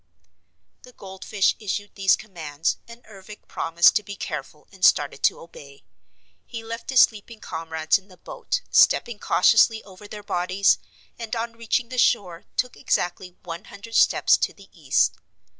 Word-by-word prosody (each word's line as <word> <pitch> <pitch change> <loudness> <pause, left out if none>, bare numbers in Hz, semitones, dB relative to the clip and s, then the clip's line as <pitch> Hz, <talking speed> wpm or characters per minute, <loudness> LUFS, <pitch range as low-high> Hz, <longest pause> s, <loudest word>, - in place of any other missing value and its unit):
The 250 - -16
goldfish 190 0 -1
issued 205 -1 -4
these 195 -2 +3
commands 160 -7 -4
and 235 +1 -14
Ervic 210 0 -14
promised 165 +1 +3
to - - -2
be 205 0 -8
careful 150 -4 -7
and 190 -2 -15
started 145 -1 +3
to - - +2
obey. 140 -4 -14 0.6
He 230 -2 -8
left 230 +1 -7
his 260 -2 +6
sleeping 220 +1 0
comrades 160 -1 -1
in 195 - -25
the 185 -2 -18
boat, - - -4
stepping 235 -3 +3
cautiously 220 +3 +3
over 200 +1 -14
their 210 0 -9
bodies, 185 +1 +1 0.4
and 230 0 -4
on 230 0 -4
reaching 230 +1 -2
the 255 -1 -3
shore 180 -9 +1
took 250 -1 -1
exactly 180 +1 -2
one 170 +3 -8
hundred 210 +3 -12
steps - - +4
to - - -2
the - - -18
east. - - +1
200 Hz, 160 wpm, -23 LUFS, 175-230 Hz, 0.6 s, his